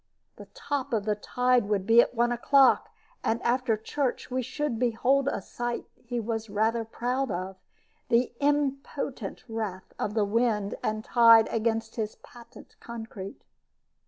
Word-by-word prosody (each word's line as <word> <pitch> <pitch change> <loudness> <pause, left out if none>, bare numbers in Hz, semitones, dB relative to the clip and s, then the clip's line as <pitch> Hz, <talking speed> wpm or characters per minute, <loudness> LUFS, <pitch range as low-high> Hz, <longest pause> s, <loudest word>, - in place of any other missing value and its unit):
The - - -11
top 285 - -3
of 210 -3 0
the 215 - +2
tide 250 +2 +1
would 200 -3 0
be 230 +2 +7
at 245 - -2
one 240 +1 +2
o'clock, 265 +3 +4 0.3
and 230 - +1
after 240 -2 +1
church 255 +4 -3
we 255 +1 0
should 260 -1 -3
behold 255 +3 +2
a 200 - -1
sight 240 +3 -4
he 240 0 -5
was 225 -1 -3
rather 220 +3 +1
proud 250 +4 -2
of 185 0 -4 0.5
the 235 +1 +2
impotent 275 -5 -1
wrath 215 -5 -5
of 210 - -2
the 215 -2 +2
wind 210 -1 +1
and 215 0 -2
tide 230 -2 +7
against 225 0 -1
his 215 -2 -2
patent 235 -1 -16
concrete. 225 -4 -8
235 Hz, 150 wpm, -27 LUFS, 220-250 Hz, 0.5 s, be